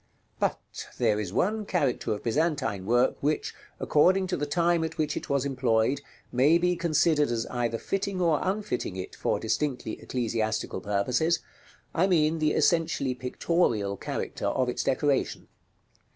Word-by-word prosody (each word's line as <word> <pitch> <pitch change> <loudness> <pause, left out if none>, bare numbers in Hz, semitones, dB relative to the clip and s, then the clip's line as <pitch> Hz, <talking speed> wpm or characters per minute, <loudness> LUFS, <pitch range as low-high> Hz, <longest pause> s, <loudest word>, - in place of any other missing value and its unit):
§ - - -42
LVII. - - -40 0.3
But - - -3
there 105 0 +2
is 100 -4 -3
one 210 - 0
character 160 - 0
of 105 - -3
Byzantine 130 - 0
work 120 +3 +3
which, 150 +2 -1 0.3
according 185 +5 +3
to 185 - -1
the 145 - -2
time 170 +2 +2
at 160 0 -4
which 155 -1 0
it - - -5
was 140 -1 +1
employed, 130 -1 +1 0.3
may 140 +7 +4
be 180 +1 +1
considered 155 -3 +2
as 115 -1 -1
either 120 -2 -1
fitting 195 - -2
or 165 -4 +3
unfitting 190 - -2
it 95 -1 -6
for - - -1
distinctly 135 -7 -2
ecclesiastical 110 -5 -2
purposes; 125 +11 +1 0.6
I 180 +3 +3
mean 160 -3 +2
the 155 -1 +2
essentially 160 -6 +2
pictorial 125 - 0
character - - -4
of 130 -1 +1
its - - -2
decoration. 140 +1 0
145 Hz, 155 wpm, -27 LUFS, 120-170 Hz, 0.6 s, may